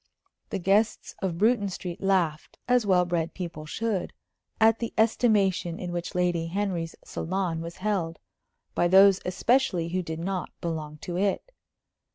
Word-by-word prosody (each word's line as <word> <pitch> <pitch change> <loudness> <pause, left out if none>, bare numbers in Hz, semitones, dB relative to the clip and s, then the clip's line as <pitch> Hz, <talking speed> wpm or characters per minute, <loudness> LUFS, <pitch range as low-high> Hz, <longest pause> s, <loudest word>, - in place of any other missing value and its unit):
The 200 - -2
guests 200 +4 +1
of 185 -4 -2
Bruton 210 0 +3
Street 180 -2 -6
laughed, 180 -6 0
as 245 -3 +3
well 180 -2 +4
bred 170 -1 -2
people 170 -4 -6
should, 210 +1 -2 0.5
at 225 0 +5
the 230 - -4
estimation 205 -6 +2
in 180 -1 -5
which 175 0 -4
Lady 175 -2 +1
Henry's 175 -3 -2
salon 175 -2 -2
was 170 +1 -7
held, 185 -5 -1 0.6
by 175 - +2
those 195 +1 +6
especially 190 -3 +1
who 185 +2 -1
did 160 -2 -5
not 185 +1 -3
belong 155 -3 -4
to 175 0 -4
it. 200 - -1
185 Hz, 150 wpm, -27 LUFS, 170-205 Hz, 0.6 s, those